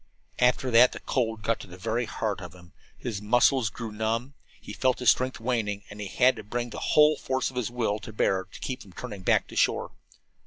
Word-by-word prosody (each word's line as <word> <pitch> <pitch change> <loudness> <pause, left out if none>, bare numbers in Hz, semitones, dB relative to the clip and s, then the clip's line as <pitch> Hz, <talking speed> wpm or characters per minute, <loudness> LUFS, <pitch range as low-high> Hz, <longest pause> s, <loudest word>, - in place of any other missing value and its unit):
After 125 +1 +2
that 120 +2 +6
the - - -7
cold 115 -4 -1
got 115 +3 0
to - - -10
the 90 0 -11
very 115 +5 -1
heart 110 -2 -3
of 90 -1 -9
him. 90 -1 -17 0.2
His 110 -5 -4
muscles 120 +2 +3
grew 115 +1 -7
numb, 115 +5 -2 0.3
he - - -9
felt 130 -1 +1
his 125 -2 +5
strength 130 0 -1
waning, 110 -4 -1
and 105 0 -8
he 100 - -4
had 125 +6 +3
to 110 - -7
bring 120 +3 -4
the - - -6 0.2
whole 150 0 +7
force 130 -2 -2
of - - -17
his 125 -2 -1
will 115 -4 -1
to 105 - -9
bear 95 -3 +1
to 100 - -13
keep 130 -1 -4
from 95 - -14
turning 105 -4 -7
back - - +3
to - - -10
shore. - - +1
115 Hz, 230 wpm, -27 LUFS, 105-125 Hz, 0.3 s, whole